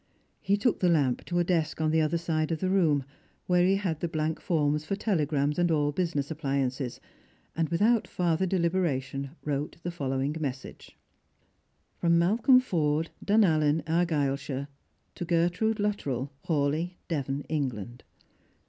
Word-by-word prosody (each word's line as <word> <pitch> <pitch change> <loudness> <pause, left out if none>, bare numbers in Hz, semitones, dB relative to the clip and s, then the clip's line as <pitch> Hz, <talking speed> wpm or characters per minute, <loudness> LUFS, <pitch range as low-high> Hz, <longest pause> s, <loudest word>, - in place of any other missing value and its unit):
He 200 +1 +2
took 225 +3 +1
the 180 - +3
lamp 140 -7 +1
to 175 - -2
a 175 - +3
desk 165 -3 0
on 155 -1 +1
the 160 0 +3
other 155 +2 +1
side 160 -1 -1
of 160 - -1
the 185 0 0
room, 160 -8 +3 0.4
where 180 -1 +3
he 190 +2 +4
had 185 -6 -2
the 170 - -1
blank 155 0 -2
forms 150 -3 +1
for 195 - -2
telegrams 150 -7 0
and 175 0 +3
all 145 -2 +2
business 155 -3 -2
appUances, 135 -4 -2 0.6
and, 160 -2 0
without 215 +7 +2
farther 175 +1 0
deliberation, 170 -7 -1 0.2
wrote 145 +1 -2
the 175 - -3
follow 135 -5 -2
ing 140 +3 -1
message: 135 -4 -6 0.6
" - - -44
Malcolm 190 +10 +4
Forde, 160 -9 0
Dunallen, 160 -8 +3
Argyleshire, 145 -5 -1 0.5
to - - -5
Gertrude 175 +6 +1
Luttrell, 145 -11 -2 0.2
Hawleigh, 155 +3 0
Devon, 140 -3 -2
England. 125 -6 -3
160 Hz, 150 wpm, -28 LUFS, 145-175 Hz, 0.6 s, he